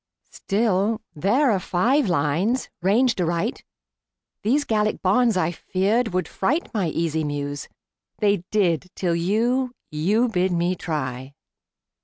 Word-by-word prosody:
Still, 210 +1 0 0.2
there 235 - +2
are 195 - +1
five 230 - +1
lines 175 - 0
ranged 220 +3 +2
aright. 170 +7 -1 0.8
These 275 +7 +2
Gallic 215 -4 0
bonds, 220 +3 +3
I 175 -2 +1
feared, 200 +7 0
would 185 0 -1
fright 285 - -1
My 200 -6 0
easy 160 0 -1
Muse. 145 -1 -4 0.5
They 205 -1 +2
did, 185 -4 +1
till 175 -3 0
you 240 +8 0 0.2
You 200 +11 +2
bid 185 -4 0
me 175 +1 +1
try! 135 -5 -4
190 Hz, 125 wpm, -23 LUFS, 170-225 Hz, 0.8 s, bonds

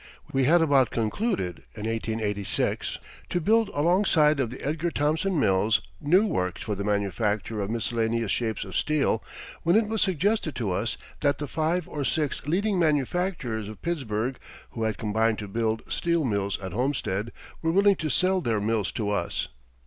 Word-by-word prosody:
We 135 -1 +3
had 165 +4 +5
about 140 -5 +4
concluded 115 - -1 0.2
in 105 - -7
1886 110 -3 -1 0.3
to 175 - 0
build 220 +4 +3
alongside 155 -2 +3
of 125 -4 +1
the 125 - -8
Edgar 160 +4 0
Thomson 160 +4 0
Mills 105 0 +3 0.2
new 180 +8 +4
works 90 - -1
for 105 - -2
the 100 0 -3
manufacture 105 +1 -1
of 100 - -3
miscellaneous 115 -1 0
shapes 110 -2 -1
of - - -8
steel 150 -2 +1 0.4
when 170 +2 +3
it 220 -1 +4
was 220 0 -1
suggested 190 -2 +1
to 110 -6 -1
us 100 +6 -1 0.2
that 145 -1 +2
the 145 - -4
five 160 +4 0
or 145 - -3
six 145 0 -1
leading 195 +4 +1
manufacturers 150 - 0
of 110 - -11
Pittsburgh, 130 -7 -2 0.3
who 115 -1 -2
had 110 -2 -1
combined 110 +1 +1
to 105 - -5
build 110 +2 -1
steel 170 -3 0
mills 100 -4 0
at 95 -1 -5
Homestead, 115 -4 -1 0.3
were 165 - 0
willing 200 +2 +5
to 155 - -2
sell 185 +5 +2
their 115 -8 0
mills 105 -1 0
to 105 -2 -1
us. 100 - -1
130 Hz, 170 wpm, -26 LUFS, 110-165 Hz, 0.4 s, had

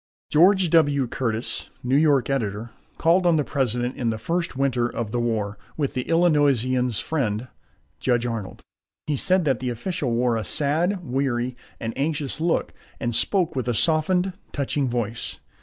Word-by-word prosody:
George 185 +2 +5
W. 145 -5 +4
Curtis, 115 -1 -2
New 125 +2 +1
York 145 -4 +4
editor, 115 -4 -2 0.3
called 175 +3 +3
on 170 - +4
the 150 - +2
President 125 -3 -1
in 120 -3 -1
the 110 - -1
first 170 +8 -2
winter 130 -3 +1
of 115 -3 -4
the 120 - -1
war, 105 -3 -1 0.2
with 145 -3 -1
the 125 - -2
Illinoisian's 135 -8 +2
friend, 125 -6 -2 0.5
Judge 120 -2 +1
Arnold. 115 -5 -5 0.4
He 150 - 0
said 185 +4 +2
that 135 -5 +1
the 125 - -2
official 140 +4 -3
wore 120 0 +1
a 110 - -2
sad, 165 - +1
weary, 125 -2 -1 0.2
and 115 0 -4
anxious 145 +1 -2
look, 170 0 0 0.3
and 120 - -2
spoke 175 - +3
with 130 -2 -2
a 120 - 0
softened, 180 - +2 0.2
touching 140 -1 -1
voice. 120 -1 -3
130 Hz, 160 wpm, -24 LUFS, 120-155 Hz, 0.5 s, George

